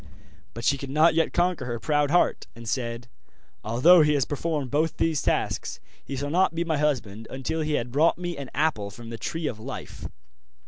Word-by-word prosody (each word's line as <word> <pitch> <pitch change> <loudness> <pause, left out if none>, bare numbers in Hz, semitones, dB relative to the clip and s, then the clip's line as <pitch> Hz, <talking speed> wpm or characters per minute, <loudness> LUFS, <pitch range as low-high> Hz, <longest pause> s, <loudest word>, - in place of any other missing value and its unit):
But 115 +1 -5
she 140 - +2
could 140 - -6
not 155 +4 +4
yet 165 0 +2
conquer 175 -6 +1
her 120 -1 -3
proud 145 0 +1
heart, 175 +3 +2
and 115 0 -10
said: 115 0 -3 0.6
'Although 130 +11 +6
he 150 -1 +3
has 135 -3 +2
performed 145 -2 -2
both 155 +2 +1
the 165 - +1
tasks, 150 - -1 0.2
he 140 - -6
shall 140 +2 -3
not 180 0 +2
be 170 - 0
my 160 -3 -1
husband 115 -8 -1
until 135 +5 -3
he 155 0 -1
had 120 -4 -1
brought 155 +6 +3
me 175 -1 -4
an 140 -2 -7
apple 145 -9 0
from 115 +3 -10
the 115 - -6
Tree 160 +8 -3
of 120 -7 -3
Life. - - -7
145 Hz, 200 wpm, -26 LUFS, 120-160 Hz, 0.6 s, Although